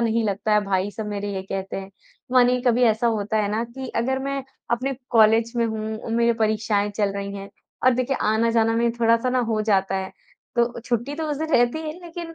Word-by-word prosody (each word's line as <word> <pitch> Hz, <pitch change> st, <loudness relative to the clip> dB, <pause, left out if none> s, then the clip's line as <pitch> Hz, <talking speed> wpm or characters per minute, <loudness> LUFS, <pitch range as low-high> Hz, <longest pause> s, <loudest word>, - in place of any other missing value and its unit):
नहीं 230 Hz, 0 st, +1 dB
लगता 205 Hz, +1 st, -1 dB
है 210 Hz, -, +5 dB
भाई 195 Hz, 0 st, 0 dB
सब 215 Hz, 0 st, -6 dB
मेरे 205 Hz, 0 st, -3 dB
ये 190 Hz, -, -3 dB
कहते 195 Hz, 0 st, -5 dB
हैं। 195 Hz, 0 st, -7 dB, 0.4 s
मानिए 250 Hz, 0 st, +4 dB
कभी 245 Hz, 0 st, +3 dB
ऐसा 225 Hz, +1 st, +2 dB
होता 215 Hz, +1 st, -2 dB
है 205 Hz, -, -1 dB
ना 220 Hz, +2 st, 0 dB
कि 260 Hz, +2 st, -8 dB
अगर 260 Hz, +3 st, +1 dB
मैं 275 Hz, 0 st, -2 dB, 0.3 s
अपने 255 Hz, +3 st, 0 dB, 0.2 s
कॉलेज 225 Hz, 0 st, +4 dB
में 235 Hz, -, +2 dB
हूँ 220 Hz, 0 st, -3 dB
उम, 225 Hz, 0 st, -6 dB
मेरी 235 Hz, 0 st, +3 dB
परीक्षाएँ 215 Hz, -1 st, +1 dB
चल 205 Hz, -2 st, +1 dB
रही 200 Hz, 0 st, -4 dB
हैं 195 Hz, 0 st, -8 dB, 0.4 s
और 255 Hz, -, +5 dB
देखिए 255 Hz, +2 st, 0 dB
आना-जाना 225 Hz, +1 st, +2 dB
में 235 Hz, 0 st, +2 dB
थोड़ा-सा 230 Hz, +1 st, +2 dB
ना 255 Hz, -, +1 dB
हो 220 Hz, -2 st, +1 dB
जाता 195 Hz, -3 st, +1 dB
है। 190 Hz, 0 st, -4 dB, 0.4 s
तो 235 Hz, 0 st, +1 dB
छुट्टी 240 Hz, +3 st, -2 dB
तो 320 Hz, +1 st, -3 dB
उस 290 Hz, -, -1 dB
दिन 315 Hz, +1 st, -2 dB
रहती 240 Hz, +5 st, +3 dB
है -, -, -3 dB
लेकिन 335 Hz, -1 st, -8 dB
230 Hz, 220 wpm, -23 LUFS, 210-245 Hz, 0.4 s, है